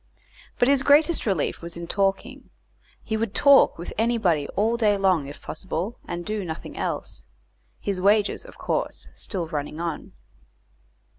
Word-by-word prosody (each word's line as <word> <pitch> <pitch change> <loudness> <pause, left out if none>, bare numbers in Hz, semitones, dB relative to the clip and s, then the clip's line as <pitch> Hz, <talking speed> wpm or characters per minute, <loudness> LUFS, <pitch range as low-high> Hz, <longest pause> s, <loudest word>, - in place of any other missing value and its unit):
But 245 - +3
his 275 -1 +4
greatest 295 +1 +4
relief 190 -8 0
was 170 0 -7
in 170 - -5
talking; 200 +9 -1 0.5
he 220 - -2
would 220 -1 -2
talk 280 -1 +6
with 170 - -7
anybody 210 -11 +2
all 220 +4 +2
day 215 -3 +2
long 185 -7 +2
if 145 - -11
possible, 190 +5 -4
and 175 0 -5
do 215 -1 -2
nothing 160 -3 -7
else; - - -4 0.6
his 195 -3 -2
wages, 205 +2 +3
of - - -14
course, - - -3
still 180 -5 -3
running 150 -1 -4
on. 170 -2 -4
195 Hz, 150 wpm, -25 LUFS, 170-230 Hz, 0.6 s, talk